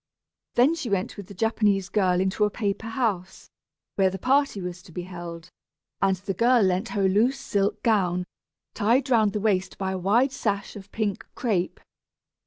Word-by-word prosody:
Then 255 +6 +5
she 315 -8 -4
went 195 -2 -1
with 200 -3 -9
the 200 - -11
Japanese 205 -2 +1
girl 185 -3 +2
into 190 +3 +1
a 210 - +3
paper 205 0 -3
house, 220 -6 -3 0.5
where 190 -1 +4
the 190 - -5
party 270 +1 +2
was 180 -1 -6
to 175 - -16
be 175 +2 -5
held, 175 -1 -8 0.5
and 195 -1 +3
the 195 +1 -4
girl 235 +3 +4
lent 185 +4 +1
her 195 - +2
a - - +5
loose 225 +8 +2
silk 200 0 -1
gown, 180 -5 +2 0.5
tied 245 +5 +1
round 215 -4 +4
the 210 - -1
waist 195 -3 0
by 190 -1 -2
a 190 - -3
wide 230 +9 +3
sash 200 -6 -2
of 200 -1 -11
pink 210 -2 -2
crêpe. 200 -8 -1
200 Hz, 185 wpm, -25 LUFS, 185-225 Hz, 0.5 s, Then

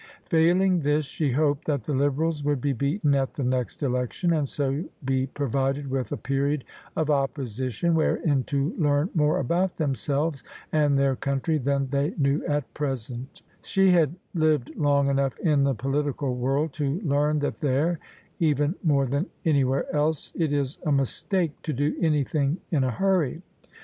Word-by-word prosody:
Failing 180 +2 +3
this, 150 0 +1
she 145 +1 -2
hoped 145 +1 +1
that 140 -6 0
the 150 - -3
Liberals 145 +3 0
would 145 -1 +1
be 140 +2 0
beaten 145 - +1
at 135 -1 0
the 140 - -2
next 125 +3 -1
Election, 125 +6 0
and 150 -4 0
so 140 +2 -1 0.2
be 130 0 +1
provided 135 +1 -1
with 130 -4 -2
a - - -2
period 140 +1 -1 0.3
of 155 -1 +1
Opposition 135 +1 -1
wherein 155 -3 +2
to 140 +2 -1
learn 145 +3 +2
more 150 -4 +2
about 175 +7 0
them 150 -4 0
selves 140 +4 -1 0.3
and 145 -2 +3
their 135 -1 +2
country 140 +4 -1
than 140 +1 0
they 140 +4 0
knew 140 0 +1
at 145 -5 -2
present 130 -2 -5 0.2
She 195 -1 +3
had 165 -3 +3 0.2
lived 155 -6 +1
long 140 -2 +2
enough 135 -1 0
in 150 -4 +2
the 135 -1 +1
political 135 +2 -1
world 135 +5 0
to 145 +2 -1
learn 150 -2 +1
that 145 - -2
there— 150 +4 +1 0.4
even 150 -1 +2
more 140 -5 +3
than 140 - -1 0.2
anywhere 140 -4 +2
else 150 0 0
— - - -33
it 160 -4 0
is 140 -1 -1
a 155 - 0
mistake 155 - 0
to 155 - -3
do 145 +3 0
anything 150 -1 +1
in 145 -6 +2
a 130 - +1
hurry. 175 +1 0
145 Hz, 170 wpm, -26 LUFS, 135-155 Hz, 0.4 s, Failing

